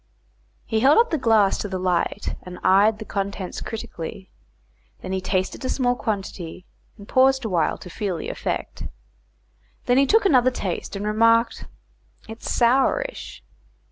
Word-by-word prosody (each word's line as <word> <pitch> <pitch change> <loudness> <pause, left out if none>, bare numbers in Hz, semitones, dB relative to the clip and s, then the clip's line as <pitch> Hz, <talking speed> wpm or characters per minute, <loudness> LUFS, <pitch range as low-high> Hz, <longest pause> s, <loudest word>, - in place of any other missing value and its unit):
He 220 - 0
held 270 +6 +5
up 470 +1 +4
the 320 - 0
glass 220 -5 +3
to - - -3
the 190 -1 -4
light, 180 +2 -1
and 180 0 -9
eyed 205 +3 +4
the 220 - -8
contents 200 -2 -4
critically; 190 -4 -7 0.7
then - - -6
he 190 0 -1
tasted 185 +4 -2
a 255 - -2
small 245 -2 +1
quantity, 190 -6 -5 0.3
and 200 -1 -13
paused 265 -1 +3
awhile 175 -7 0
to - - -12
feel 190 -1 -3
the - - -5
effect. - - -4
He - - -4 1.0
then 265 +3 +4
took 445 +5 +4
another 255 -8 +5
taste, 200 -6 -4
and 200 +1 -4
remarked, 230 +2 +2 0.6
"It's 225 +1 -6
sourish." 265 - +1
215 Hz, 150 wpm, -23 LUFS, 190-250 Hz, 1.0 s, held